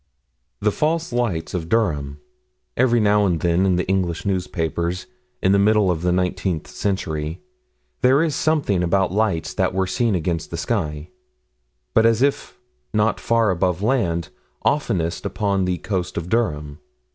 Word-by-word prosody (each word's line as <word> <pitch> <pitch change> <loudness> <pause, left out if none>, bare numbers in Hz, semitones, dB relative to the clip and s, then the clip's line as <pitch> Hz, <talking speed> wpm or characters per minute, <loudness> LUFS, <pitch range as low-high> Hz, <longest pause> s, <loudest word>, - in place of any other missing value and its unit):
"The 105 +1 +2
False 160 +3 -1
Lights 115 -10 -1
of 85 -3 -3
Durham." 75 -11 0 0.6
Every 120 -1 +3
now 105 -1 +3
and 85 -3 0
then 85 +3 +2
in 95 - +3
the 90 - -1
English 90 -2 -1
newspapers, 90 -2 -2 0.4
in 95 - +4
the 100 - +4
middle 105 -2 +4
of 80 -2 -2
the 90 0 +1
nineteenth 90 -2 -1
century, 80 -4 -3 0.6
there 135 +5 +5
is 160 -3 0
something 145 - +1
about 90 +1 +1
lights 95 -6 0
that - - 0
were 95 0 +2
seen 105 +3 0
against 85 -2 -2
the 85 - -5
sky, 80 -6 -2 0.8
but 110 - +5
as 115 +2 +3
if 140 0 -1 0.4
not 105 +1 +2
far 115 -3 +2
above 90 +1 0
land, 95 - 0 0.4
oftenest 95 - 0
upon 100 -3 0
the 90 -1 0
coast 90 +2 -3
of 85 +1 -3
Durham. 75 -10 -1
95 Hz, 155 wpm, -22 LUFS, 85-110 Hz, 0.8 s, there